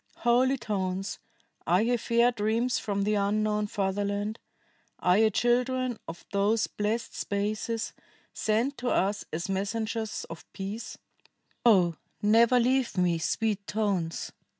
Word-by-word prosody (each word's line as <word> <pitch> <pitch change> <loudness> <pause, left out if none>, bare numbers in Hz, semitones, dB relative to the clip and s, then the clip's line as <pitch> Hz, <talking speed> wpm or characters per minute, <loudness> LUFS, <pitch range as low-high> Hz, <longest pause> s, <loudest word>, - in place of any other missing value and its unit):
"Holy 255 +3 +4
tones, 195 -4 -3 0.5
are 180 +5 +4
ye 245 +2 +2
fair 235 +1 +3
dreams 230 +2 0
from 200 -1 -1
the 210 +1 +1
unknown 210 +1 +1
fatherland? 205 +2 -2 0.6
Are 180 +3 +3
ye 220 0 +5
children 245 +2 +1
of 165 +1 -8
those 205 +3 +2
blessed 215 +3 -2
spaces, 215 +2 -2 0.4
sent 235 +6 0
to 245 0 -1
us 200 +2 +1
as 165 +2 -3
messengers 220 +3 -2
of 165 - -11
peace? 200 +4 -6 0.7
O 180 -8 +4 0.2
never 230 +4 +5
leave 255 -2 +1
me, 175 -2 +2
sweet 205 +4 -1
tones! 195 -6 -1
215 Hz, 125 wpm, -28 LUFS, 200-235 Hz, 0.7 s, ye